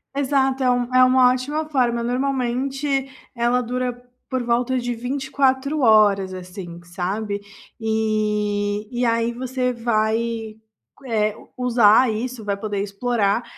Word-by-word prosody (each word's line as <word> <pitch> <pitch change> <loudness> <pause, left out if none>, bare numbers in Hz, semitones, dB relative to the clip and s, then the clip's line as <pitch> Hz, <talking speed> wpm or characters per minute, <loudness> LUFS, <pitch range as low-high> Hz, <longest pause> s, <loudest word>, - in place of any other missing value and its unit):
Exato, 270 -1 +1
é 255 - +3
um 245 0 0
é 255 - +7
uma 255 0 +5
ótima 290 +5 -2
forma 240 -5 +1
normalmente 270 +2 -1 0.3
ela 240 +1 +2
dura 250 0 -3 0.3
por 255 -2 -1
volta 240 +2 +1
de 245 -1 -2
24h 265 +3 0
horas 205 -5 +4
assim, 180 -1 -8
sabe, 200 +4 -3 0.4
e 210 -1 0
e 245 0 -2
aí 230 +1 +1
você 250 0 -2
vai, 225 -1 -1 0.5
eh, 215 -2 0 0.2
usar 240 -1 +4
isso, 235 +1 -4
vai 200 -1 0
poder 205 0 -4
explorar 205 +1 0
240 Hz, 125 wpm, -22 LUFS, 215-255 Hz, 0.5 s, é